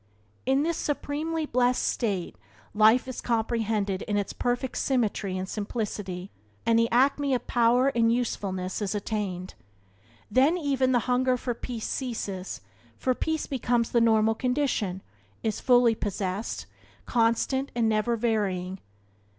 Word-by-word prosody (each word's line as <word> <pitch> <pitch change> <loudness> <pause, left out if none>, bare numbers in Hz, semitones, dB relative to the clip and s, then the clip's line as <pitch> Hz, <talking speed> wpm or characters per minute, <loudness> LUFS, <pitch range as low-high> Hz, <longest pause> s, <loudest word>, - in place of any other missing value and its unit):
In 270 +2 +3
this 335 +1 0
supremely 305 +2 -2
blessed 250 -2 +2
state 200 -7 -1 0.4
life 220 +4 +5
is 260 - -5
comprehended 220 -4 0
in 205 - -1
its 205 - -2
perfect 245 +1 -1
symmetry 215 -7 0
and 185 0 -3
simplicity 200 -3 -4 0.3
and 230 0 +4
the 230 0 +2
acme 275 +2 +3
of 245 - -3
power 245 +2 +3
and 230 -3 +2
usefulness 195 -6 -2
is 205 0 -1
attained. 195 -3 -3 0.8
Then 275 +9 +4
even 270 -5 +1
the 245 - +4
hunger 255 0 +2
for 245 0 -2
peace 235 -1 -5
ceases, 205 -7 -4 0.4
for 255 - +1
peace 315 +4 -2
becomes 240 -3 0
the 235 - +3
normal 220 -1 +4
condition, 250 -7 -1 0.4
is 220 -2 -1
fully 245 -2 +5
possessed, 200 -1 -3 0.4
constant 240 +4 +1
and 235 -2 +2
never 220 +2 +1
varying. 195 -5 -1
230 Hz, 135 wpm, -27 LUFS, 205-255 Hz, 0.8 s, life